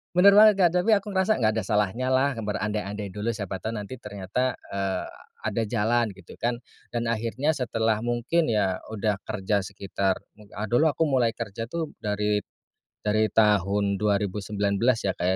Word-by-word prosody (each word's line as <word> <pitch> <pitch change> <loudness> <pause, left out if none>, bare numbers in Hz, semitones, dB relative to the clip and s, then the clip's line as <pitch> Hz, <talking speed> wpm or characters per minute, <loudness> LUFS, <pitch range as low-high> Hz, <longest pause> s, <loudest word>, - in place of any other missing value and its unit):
benar 200 +3 +8
banget 215 -1 +8
Kak, 175 -3 +5
tapi 225 - +2
aku 200 +1 -2
ngerasa 190 +3 +2
"nggak 110 -1 +3
ada - - -3
salahnya 105 +5 0
lah, 140 +2 +3
berandai-andai 105 -1 -3
dulu, 105 +2 -4
siapa 100 -2 -4
tahu 110 +1 -4
nanti" 105 +5 -6
ternyata, 105 +5 -2 0.2
eee, 95 -1 -2 0.4
ada 110 +2 -1
jalan, 115 -1 +1
gitu 95 - -13
kan. 120 +1 0 0.4
Dan 115 0 0
akhirnya 115 +7 0
setelah 115 -3 0
mungkin 120 +8 +1
ya, 95 -3 +1
udah 105 -1 0
kerja 105 -1 0
sekitar, 100 -1 -1 0.2
mu 105 - -15
a 105 - -4
dulu 150 +7 +4
aku 165 - +2
mulai 120 -4 +2
kerja 115 0 -5
tuh 160 +3 -4
dari 105 0 0 0.7
dari 110 +1 +3
tahun 100 -1 +3
2019 105 +3 +1
ya 95 - +1
Kak 85 - -2
105 Hz, 165 wpm, -26 LUFS, 100-120 Hz, 0.7 s, benar